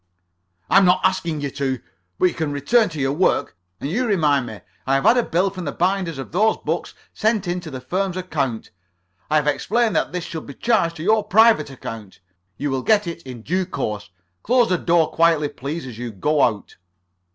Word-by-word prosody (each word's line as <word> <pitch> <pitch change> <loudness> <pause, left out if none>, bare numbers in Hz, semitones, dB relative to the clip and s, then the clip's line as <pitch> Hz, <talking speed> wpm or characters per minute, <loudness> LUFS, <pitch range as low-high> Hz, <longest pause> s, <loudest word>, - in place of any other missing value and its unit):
"I'm 195 +1 +5
not 180 0 +4
asking 175 -5 0
you 140 -1 -3
to. 135 -2 -2 0.4
But - - +2
you 180 - +3
can 160 -3 -2
return 145 - +2
to 155 -3 -7
your 135 0 0
work. 180 +6 +1 0.2
And - - -4
you 240 - -1
remind 150 - +2
me. 110 -4 -9 0.3
I 135 - +3
have 135 - +1
had 240 - +6
a 245 - +4
bill 190 -2 0
from 185 -2 -7
the 145 - -2
binders 180 -2 -1
of 135 - -7
those 215 +6 +2
books - - -4 0.2
sent 215 -3 0
in 175 +1 -1
to 175 - -9
the 130 -3 -6
firm's 185 +7 -2
account. 140 -11 -3 0.6
I 155 - +1
have 150 -1 +3
explained 220 +7 +1
that - - +1
this 180 0 -3
should 160 -2 -7
be 140 - -9
charged 200 -8 +1
to 155 - -7
your 215 +3 +3
private 220 -7 +4
account. 115 -6 -9 0.4
You 145 -1 -2
will 135 -1 -1
get 210 +5 +3
it 170 0 -6
in 120 -3 -8
due 185 +5 -1
course. 105 - -4 0.3
Close 245 0 +3
the 180 -2 +1
door 170 -2 +2
quietly, 165 -3 +3
please, 145 +6 -6
as 120 -3 -9
you 120 -1 -4
go 145 +9 0
out." 110 -4 0
165 Hz, 210 wpm, -21 LUFS, 140-190 Hz, 0.6 s, had